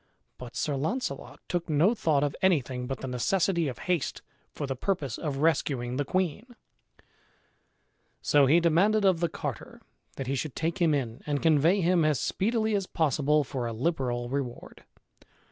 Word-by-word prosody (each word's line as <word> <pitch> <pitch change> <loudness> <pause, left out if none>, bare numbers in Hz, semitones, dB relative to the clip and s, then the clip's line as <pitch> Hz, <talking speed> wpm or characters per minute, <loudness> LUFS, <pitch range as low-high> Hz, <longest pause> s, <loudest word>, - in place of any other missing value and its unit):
But 125 -2 -9
Sir 145 - -1
Launcelot 155 - -3
took 175 -1 -2
no 160 +9 +4
thought 155 -10 +1
of 145 -1 -1
anything 130 -9 +1
but 135 0 -5
the 135 - -4
necessity 170 +7 +1
of 125 - -5
haste 180 -6 -2 0.3
for 145 - -4
the 135 -1 -3
purpose 145 - -2
of 145 -4 -3
rescuing 130 -6 0
the 145 - 0
queen; 190 - -2 1.6
so 145 -2 +4
he 160 +5 +5
demanded 195 +6 +3
of 185 -3 +4
the 170 -1 0
carter - - -6 0.4
that 135 - -4
he 135 - -2
should 140 +1 -3
take 165 +4 -2
him 160 -3 +4
in 120 -4 -3
and 145 -1 -1
convey 165 +4 +4
him 175 -1 +3
as 155 -3 +2
speedily 220 +1 0
as 195 -2 0
possible 150 -1 +2
for 125 -2 -4
a 115 - -4
liberal 125 -2 -1
reward. 130 -2 -5
150 Hz, 165 wpm, -28 LUFS, 135-175 Hz, 1.6 s, he